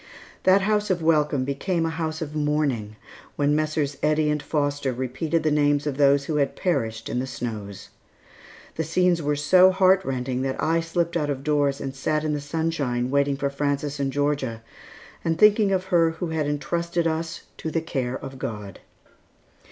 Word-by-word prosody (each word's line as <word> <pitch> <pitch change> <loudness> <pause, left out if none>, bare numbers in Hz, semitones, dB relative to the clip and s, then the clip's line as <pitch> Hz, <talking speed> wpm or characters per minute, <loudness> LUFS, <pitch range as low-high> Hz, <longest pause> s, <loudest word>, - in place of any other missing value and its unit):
That 190 +1 +6
house 210 +1 +1
of 175 -3 0
welcome 150 -4 +2
became 165 +5 -1
a 165 - -1
house 160 -1 -3
of 150 -1 -7
mourning 145 -8 -1 0.4
when 145 0 +2
Messrs. 155 -2 -1
Eddy 150 0 +2
and 150 -1 -1
Foster 145 -3 -1
repeated 130 +6 -2
the 155 - +2
names 145 -1 +2
of 145 -3 -2
those 140 -1 +4
who 155 0 -1
had 140 -2 0
perished 115 -11 -1
in 125 - -2
the 130 - -3
snows. 100 -5 -6 0.9
The 160 - 0
scenes 175 +2 +2
were 145 0 0
so 180 +6 +6
heart 190 0 +4
rending 130 -2 -2
that 130 0 -2
I 165 +1 +2
slipped 170 +1 -1
out 150 -3 0
of 135 -1 -3
doors 145 -2 +1
and 135 -1 -5
sat 150 +3 -1
in 155 -1 0
the 145 - -2
sunshine 145 -5 -1
waiting 140 0 +2
for 140 0 -1
Frances 140 0 -2
and 135 -1 0
Georgia, 140 -5 -1 0.6
and 165 -1 0
thinking 210 +1 +5
of 185 -1 +1
her 175 -3 +3
who 165 +1 -4
had 160 -2 -1
intrusted 170 +3 -1
us 160 0 -2
to 160 - -4
the 165 - 0
care 130 -6 -3
of 135 -1 -9
God. 105 -7 -6
150 Hz, 185 wpm, -24 LUFS, 135-165 Hz, 0.9 s, That